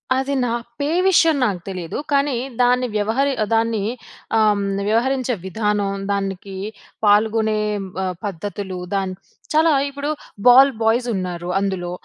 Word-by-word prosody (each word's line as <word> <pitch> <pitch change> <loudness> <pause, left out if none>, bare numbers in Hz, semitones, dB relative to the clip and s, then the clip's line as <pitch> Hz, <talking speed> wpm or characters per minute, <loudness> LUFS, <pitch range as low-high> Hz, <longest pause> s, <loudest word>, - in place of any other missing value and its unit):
అది 270 +1 -1
నా 235 - 0 0.3
పే 285 +1 0 0.2
విషయం 330 -4 +5
నాకు 190 -5 -1
తెలీదు. 180 -3 -5
కానీ 280 -2 +2 0.3
దాన్ని 250 0 +3
వ్యవహరి 240 +7 +1 0.2
దాన్ని 225 -2 +1 0.6
ఆహ్, 210 -2 +3 0.3
వ్యవహరించే 250 +3 +1
విధానం 205 0 -1 0.2
దానికి 195 -1 -3 0.5
పాల్గొనే 215 +1 +3 0.4
ఆహ్, 185 -1 -1
పద్ధతులు, 195 0 -5 0.2
దాని 190 -1 -1 0.4
చాలా 320 +1 +4 0.2
ఇప్పుడు 285 +1 -4 0.4
బాల్ 265 +3 +8
బాయ్స్ 235 +2 +2
ఉన్నారు. 180 -1 -4
అందులో 190 -3 -2
215 Hz, 120 wpm, -21 LUFS, 195-255 Hz, 0.6 s, బాల్